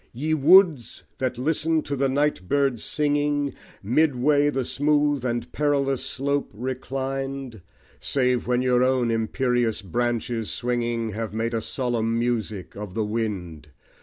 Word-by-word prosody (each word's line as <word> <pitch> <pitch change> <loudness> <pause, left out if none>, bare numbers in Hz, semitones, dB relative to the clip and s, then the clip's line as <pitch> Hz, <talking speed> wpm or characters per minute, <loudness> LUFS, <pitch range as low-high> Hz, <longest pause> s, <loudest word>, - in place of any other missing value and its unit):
Ye 150 +6 -1
Woods! 155 - +4 0.2
that 130 -2 -1
listen 160 +4 +1
to 140 - -3
the 135 0 +1
night 140 -9 0
bird's 140 -5 +1
singing, 145 -1 0 0.3
Midway 145 +4 +3
the 135 -3 -1
smooth 145 -1 +1
and 120 -1 -2
perilous 140 -3 0
slope 140 +2 -1
reclined, 130 0 -4 0.4
Save 125 -3 0
when 125 0 +1
your 125 -1 +3
own 130 -2 +2
imperious 115 0 0
branches 120 +2 -2
swinging, 120 -2 -1
Have 110 0 -5
made 115 +1 -1
a 115 - 0
solemn 115 -2 -1
music 115 -5 -2
of 105 -2 -7
the 110 -1 0
wind! 95 -9 -4
125 Hz, 135 wpm, -24 LUFS, 115-140 Hz, 0.4 s, Woods